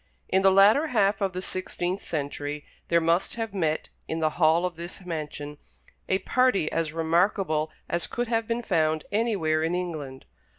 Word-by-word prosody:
In 190 - +3
the 195 - +6
latter 205 +11 +5
half 205 -6 +2
of 195 -1 0
the 185 +1 -4
sixteenth 185 0 -3
century 145 -1 -4 0.2
there 170 - +4
must 170 +2 +1
have 225 -3 -4
met, 160 -5 -1 0.2
in 160 - -2
the 155 -1 +1
hall 165 +2 +3
of 180 -1 -3
this 170 +3 -8
mansion, 150 -3 -5 0.5
a 190 - +3
party 250 -7 +2
as 165 -2 -1
remarkable 165 -1 +1 0.2
as 170 -1 0
could 240 0 -2
have 225 -1 0
been 235 +1 -1
found 160 -5 +1
anywhere 200 -8 +1
in 165 +2 0
England. 155 -7 -5
175 Hz, 170 wpm, -26 LUFS, 155-195 Hz, 0.5 s, the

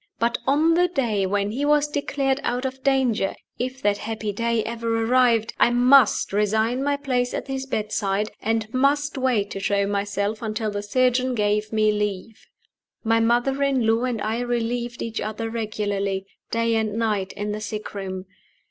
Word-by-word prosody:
But 235 +1 0
on 305 +4 +4
the 355 +2 +4
day 230 - 0
when 200 +1 0
he 265 +6 -2
was 295 0 +3
declared 280 -2 -1
out 250 -1 -2
of 265 0 -4
danger 260 -7 +1 0.2
if 255 +2 -4
that 205 0 +2
happy 220 -1 -3
day 230 +1 0
ever 230 0 -1
arrived 235 -2 +3
I - - +5
must 245 -2 +4
resign 220 +5 +1
my 285 0 +1
place 250 -3 -1
at - - -4
his 270 0 -4
bedside, 210 -3 -1
and 225 0 -1
must 285 +3 +2
wait 250 -7 0
to 195 - -4
show 200 0 +1
myself 200 +1 -2
until 215 -1 -2
the 205 0 -3
surgeon 255 +3 +1
gave 210 0 0
me 215 -1 +3
leave. 210 0 -4 0.6
My 225 0 +3
mother 240 +4 +1
in 270 -4 +2
law 225 +2 +2
and 245 -3 -2
I 220 +2 -1
relieved 240 0 -2
each 230 0 -4
other 225 +1 -4
regularly, 205 -3 -2 0.2
day 230 0 +1
and 220 -2 0
night, 210 -4 0
in 210 0 -4
the 210 +1 -4
sick 215 0 -5
room. 190 -2 -5
225 Hz, 175 wpm, -23 LUFS, 210-255 Hz, 0.6 s, I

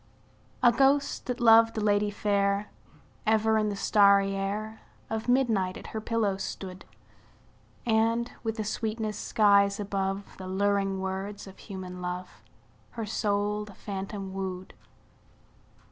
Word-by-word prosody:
A 240 - +8
ghost, 275 +4 +2
that 250 0 -2
loved 225 -1 +6
a - - +1
lady 205 0 +2
fair, 200 0 0 0.6
Ever 220 0 +3
in 215 -1 +1
the 205 - -3
starry 200 -1 +4
air 210 +3 -3 0.3
Of 220 +1 -3
midnight 225 -8 +2
at - - -11
her 220 - -3
pillow 215 -3 0
stood; 190 -1 -6 1.0
And, 230 +1 +2
with 225 0 -3
a 215 - -1
sweetness 215 0 -3
skies 200 -1 +3
above 195 -1 -3
The 185 - -8
luring 195 0 0
words 190 +2 -4
of 195 -1 -13
human 185 -3 -8
love, 180 -7 -6 0.6
Her 225 - -2
soul 210 0 -1
the 205 -2 -12
phantom 195 -1 -6
wooed. 190 -1 -5
205 Hz, 130 wpm, -28 LUFS, 195-220 Hz, 1.0 s, A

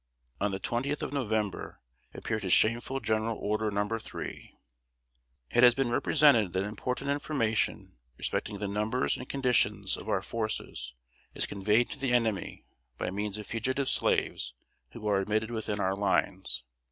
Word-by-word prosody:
On 105 - +1
the 95 -1 -3
20th 135 +8 -1
of - - -3
November 110 -7 -2 0.4
appeared 110 -1 -2
his 95 -2 -2
shameful 120 +4 +3
General 110 -2 0
Order 105 +1 0
Number 105 +2 -1
Three: - - -8 0.9
"It 120 - +4
has 120 -1 +8
been 135 -2 +1
represented 120 - +4
that 95 - +1
important 125 +7 -2
information 125 - 0 0.2
respecting 105 - -2
the 100 +1 -3
numbers 105 +5 0
and 125 - -8
condition 120 -7 +2
of 110 - -8
our 95 -3 +1
forces 110 - -3 0.4
is - - +2
conveyed 105 +4 +2
to - - -6
the 130 -2 0
enemy 110 -6 0 0.3
by - - -2
means 105 +1 -3
of 105 - -6
fugitive 130 +5 -1
slaves - - 0 0.3
who 105 - -10
are 100 -2 +3
admitted 110 +3 0
within 110 -2 -2
our 95 0 +1
lines. 95 -9 0
110 Hz, 155 wpm, -30 LUFS, 100-120 Hz, 0.9 s, has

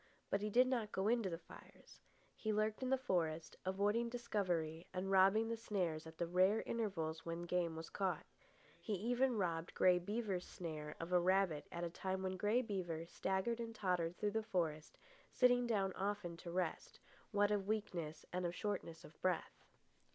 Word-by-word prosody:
But 200 - +2
he 210 - -1
did 245 +4 +6
not 240 -5 0
go 190 +1 0
into 230 -3 +2
the 165 - -3
fires. - - -15 0.4
He 220 - -2
lurked 215 +2 +1
in 255 - -1
the 265 - +4
forest, 165 -9 -1
avoiding 205 +5 +2
discovery 180 -9 -1
and 190 +1 -1
robbing 195 +4 +5
the 230 - -1
snares 180 -8 -2
at 160 0 -11
the 170 - 0
rare 185 +5 +3
intervals 165 -8 -2
when 170 +1 -4
game 175 -1 0
was 160 0 -7
caught. 190 -2 -1 0.5
He 215 - -3
even 245 +5 +2
robbed 170 -3 -1
Grey 180 -1 +5
Beaver's 200 -1 -2
snare 155 -3 -5
of 165 +2 -5
a 180 - +7
rabbit 180 -4 +2
at 170 - -4
a 170 - -1
time 190 +1 -2
when 185 0 -1
Grey 210 +7 +2
Beaver 175 -7 -3
staggered 190 +7 -1
and 230 -1 -4
tottered 180 -4 0
through 210 - 0
the 220 +1 0
forest, 165 -8 -2 0.3
sitting 245 -1 +4
down 195 -4 +1
often 195 -3 -2
to 170 - -8
rest, 180 +1 -2 0.3
what 205 -1 +3
of 200 -2 0
weakness 175 -8 -2
and 180 0 -1
of 170 - -4
shortness 180 -5 -3
of 155 - -15
breath. 185 -2 -1
190 Hz, 180 wpm, -39 LUFS, 170-215 Hz, 0.5 s, a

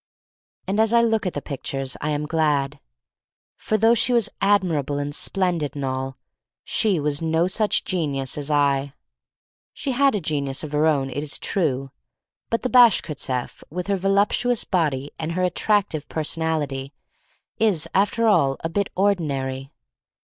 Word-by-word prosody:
And 200 +3 -1
as 220 +1 +3
I 235 - +5
look 225 -3 +1
at 180 - -3
the 145 - -5
pictures 135 -1 -4
I 150 - -1
am 150 0 -1
glad. 150 -3 0 0.8
For 215 - -1
though 225 +2 +5
she 240 +2 +2
was 230 -3 +3
admirable 175 -8 +1
and 145 0 -3
splendid, 175 -4 0
and 140 -1 -3
all, 130 0 -3 0.5
she 200 -6 +1
was 145 0 -1
no 160 +1 +1
such 210 +3 +1
genius 140 -7 -1
as 145 0 -4
I. 140 -1 +1 0.8
She 275 - -3
had 270 -1 +3
a - - 0
genius 140 -4 -2
of 155 - -6
her 150 +1 +2
own, 135 -4 +1
it 145 - -3
is 150 -1 -3
true. 135 -8 -1 0.6
But 230 - -1
the 255 - 0
Bashkirtseff, 155 - +2
with 180 +3 -4
her 200 - 0
voluptuous 200 +5 +1
body 145 -6 -1
and 165 +1 -3
her 185 +1 -1
at 180 -1 +1
tractive 200 -9 0
personality, 155 -4 -2 0.7
is 185 -8 +2
after 205 +4 +2
all 160 -11 +3
a 165 - -2
bit 200 +3 -1
ordinary. 140 -9 -1
160 Hz, 160 wpm, -23 LUFS, 140-200 Hz, 0.8 s, I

